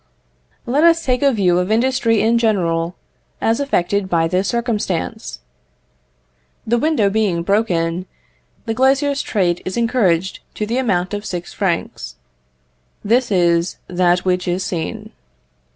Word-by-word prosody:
Let 280 +6 +1
us 335 -1 +4
take 250 -1 +1
a 280 -1 +4
view 185 -6 +2
of 180 +3 -1
industry 230 -1 +2
in 230 +1 +3
general, 175 -6 0 0.4
as 225 +3 +1
affected 200 -7 0
by 165 -2 +2
this 185 +3 0
circumstance. 210 - -3 1.2
The 235 +2 +1
window 300 -8 +2
being 195 -5 0
broken, 180 -3 0 0.6
the 225 - -1
glazier's 275 +3 +2
trade 175 -5 0
is 185 - -4
encouraged 195 -7 +1 0.2
to 210 - -2
the 235 +4 -1
amount 190 -7 0
of 205 0 -3
six 175 -4 -6
francs: 170 - -3 0.9
this 240 +4 +2
is 170 -2 +2
that 180 0 +1
which 180 -1 0
is 180 +2 -1
seen. 165 -3 -4
200 Hz, 135 wpm, -19 LUFS, 175-235 Hz, 1.2 s, us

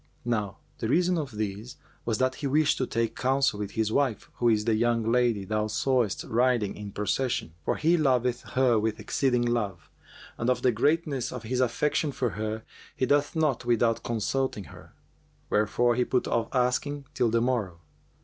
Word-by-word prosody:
Now 105 -5 -1 0.2
the 110 - -2
reason 180 +5 +3
of 145 -4 -4
this 105 +3 -4 0.3
was 115 -2 0
that 130 +2 +1
he 140 +1 -4
wished 150 +2 +2
to 130 - 0
take 115 0 -1
counsel 130 -4 +1
with 105 -1 -4
his 110 -1 0
wife, 135 -3 0
who 120 - +3
is 105 -2 +2
the 115 - +2
young 115 +1 +1
lady 120 -5 +2
thou 105 +1 -1
sawest 120 -1 0
riding 120 -3 +1
in 105 -1 -7
procession; 105 -3 -1
for - - 0
he 165 +3 +3
loveth 125 -5 +1
her 125 -3 +4
with 110 0 -1
exceeding 125 -3 +1
love, 100 -10 -2 0.5
and 115 - 0
of 125 - 0
the 125 - +4
greatness 145 +2 0
of 125 -2 -6
his 125 +3 -2
affection 145 +4 +1
for 125 -4 -1
her, 110 +1 -4 0.3
he 130 - 0
doth 145 +4 +1
naught 150 -6 +1
without 120 -1 +2
consulting 120 0 -1
her; - - -15 0.6
wherefore 115 +3 +2
he 125 +1 +2
put 125 0 0
off 115 -1 0
asking 135 +3 0
till 120 - +2
the 115 +1 +2
morrow. 115 -8 -1
120 Hz, 180 wpm, -27 LUFS, 110-130 Hz, 0.6 s, her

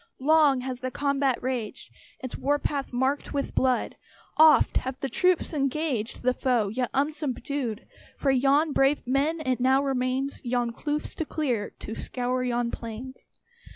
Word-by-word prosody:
Long 290 -2 +4
has 255 -1 -5
the 255 - -3
combat 280 -1 0
raged, 255 0 -4 0.3
Its 255 - -5
war 290 +2 +1
path 285 -1 -3
marked 260 +3 -1
with 280 - -2
blood; 255 -2 +1 0.4
Oft 315 0 +6
have 260 0 -3
the 270 - -3
troops 365 +1 +1
engaged 275 -6 -1
The 255 0 +3
foe, 245 -6 +1
yet 245 +3 -2
unsubdued, 280 -4 -2 0.3
For 275 - +2
yon 280 +4 +3
brave 275 +1 +2
men, 285 +6 0
it 255 -1 0
now 265 +2 +3
remains 265 0 -1
Yon 240 -1 0
kloofs 295 +5 -3
to 320 - -2
clear, 250 -10 -1
to 220 - -5
scour 250 +2 -2
yon 240 -1 -1
plains. 235 +3 -8
265 Hz, 155 wpm, -26 LUFS, 250-285 Hz, 0.4 s, Oft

